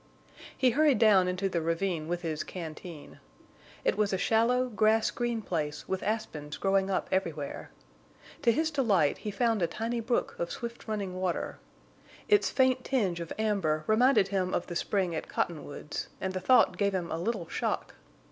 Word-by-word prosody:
He 255 -2 +4
hurried 295 +1 +4
down 200 -5 +5
into 180 +2 0
the 175 -3 -1
ravine 165 0 -1
with 175 +1 -3
his 155 -2 -2
canteen. 165 -2 -8 0.7
It - - +2
was 210 -1 +2
a 190 - +1
shallow, 235 +5 +2
grass 220 -1 +2
green 240 -2 -2
place 150 -5 -3
with 190 0 -2
aspens 160 -9 -3
growing 195 0 +1
up 190 - 0
everywhere. 165 -7 -2 0.7
To 235 - +4
his 315 +6 0
delight 205 - +2
he 210 - -4
found 225 +1 +1
a 170 - +3
tiny 225 +7 -3
brook 235 +1 -1
of 170 - -2
swift 235 0 -7
running 200 -4 -3
water. 180 -2 -2 0.7
Its 415 -2 +4
faint 260 -1 +2
tinge 200 -10 0
of 170 -1 -6
amber 195 -8 0
reminded 220 -2 +4
him 190 -2 0
of - - -1
the 175 - -7
spring 185 -1 0
at 160 - -4
Cottonwoods, 150 -3 -3
and 190 0 -2
the 185 - -2
thought 250 +8 +4
gave 200 -1 +2
him 175 -2 -3
a 160 - -2
little 185 -2 -2
shock. - - -2
195 Hz, 175 wpm, -29 LUFS, 170-225 Hz, 0.7 s, down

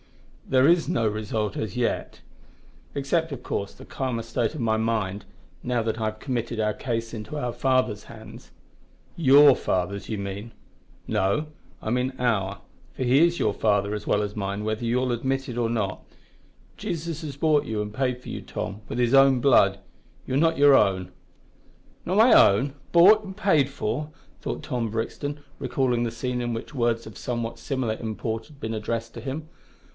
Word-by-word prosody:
"There 130 +1 +5
is 170 0 +3
no 115 -1 +1
result 105 0 -2
as 110 0 -4
yet 125 - -2 0.7
except, 160 +4 0
of 135 -3 -6
course, 100 0 -3
the - - -13
calmer 125 -4 -3
state 115 +2 -1
of - - -5
my 110 -2 +1
mind, 110 -3 -1 0.4
now 125 -1 0
that 110 0 -2
I - - 0
have 110 0 -3
committed 120 -3 -3
our 105 -1 +1
case 115 -1 -3
into 115 +7 -6
our 125 -4 -2
Father's 130 -6 +1
hands." 110 +2 -12 0.6
"Your 140 -3 +7
Father's, 100 +2 -2
you 110 - -2
mean." 100 +3 -5 0.6
"No, 100 +11 +1 0.4
I 110 - -2
mean 125 +2 0
our, 100 -6 0 0.3
for - - -2
He 135 +6 +5
is 170 0 0
your - - +1
father 100 -1 +1
as 105 0 -4
well 105 - +2
as 105 0 -5
mine, 100 0 -3
whether 110 +2 -2
you 120 +2 +1
admit 135 +3 -1
it 120 -2 -6
or 120 -1 +1
not. 105 -5 -2 0.7
Jesus 165 -1 -4
has 145 -4 -6
bought 150 0 +3
you 110 -1 -3
and 105 0 -5
paid 125 +1 -1
for - - -15
you, - - -5
Tom, 105 -1 -5
with - - -4
His 120 0 +2
own 135 -1 +6
blood. 100 -7 +4 0.5
You - - -4
are - - +3
not 165 +2 +3
your 145 0 +7
own." 95 -6 +3 0.9
"Not 185 +3 0
my 230 +3 +7
own? 125 +8 +5 0.2
bought 200 +6 +7
and 190 -1 -9
paid 160 -10 +3
for!" 140 +2 -3 0.3
thought - - -5 0.2
Brixton, 145 +6 -3 0.2
recalling 125 -3 0
the 115 - -1
scene 125 +1 -3
in 120 -1 -2
which 115 +6 -6
words 120 -3 0
of 110 -4 -10
somewhat 115 -1 -4
similar 120 -2 -2
import 110 0 -4
had 150 -3 -18
been 110 -2 -4
addressed 115 +1 -3
to - - -8
him. 145 +3 -5
120 Hz, 180 wpm, -25 LUFS, 110-135 Hz, 0.9 s, Your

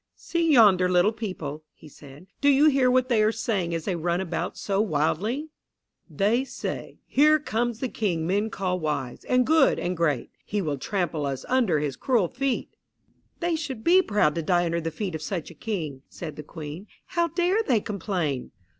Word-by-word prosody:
"See 335 -2 0
yonder 200 -8 +6
little 180 +3 +4
people," 185 -9 -5
he - - -15
said; 145 +2 -14 0.2
"do 285 - +5
you 280 +2 +5
hear 270 -3 +3
what 255 0 +3
they 235 -4 +3
are 215 +1 +4
saying 205 -7 -1
as 165 - -4
they 190 - -1
run 170 +1 0
about 175 -1 -3
so 200 0 0
wildly? 210 - 0 0.6
"They 205 - +1
say, 270 - -6
'Here 305 +2 +5
comes 240 -5 -2
the 260 - 0
King 180 -9 -1
men 205 +5 0
call 185 -3 -2
wise, 150 -6 -3
and 250 0 +3
good, 315 -1 +4
and 180 +1 -2
great. 150 -8 0
He 205 - -2
will 150 -7 -2
trample 165 -4 -1
us 135 -2 -4
under 240 -11 +2
his 145 -2 -2
cruel 230 -10 +1
feet.'" 270 -1 -2 0.7
"They 345 -1 +1
should 275 -8 -5
be 365 +2 +6
proud 205 - +2
to 165 - -2
die 175 +2 +2
under 170 0 -1
the 165 - -2
feet 180 +3 -4
of 160 - -4
such 170 0 -4
a - - -11
King," 155 -7 -4
said 160 -3 -7
the - - -7
Queen. 155 +5 -8 0.2
"How 340 -1 0
dare 355 +5 +1
they 255 - +2
complain!" 180 - -3
195 Hz, 190 wpm, -26 LUFS, 160-250 Hz, 0.7 s, yonder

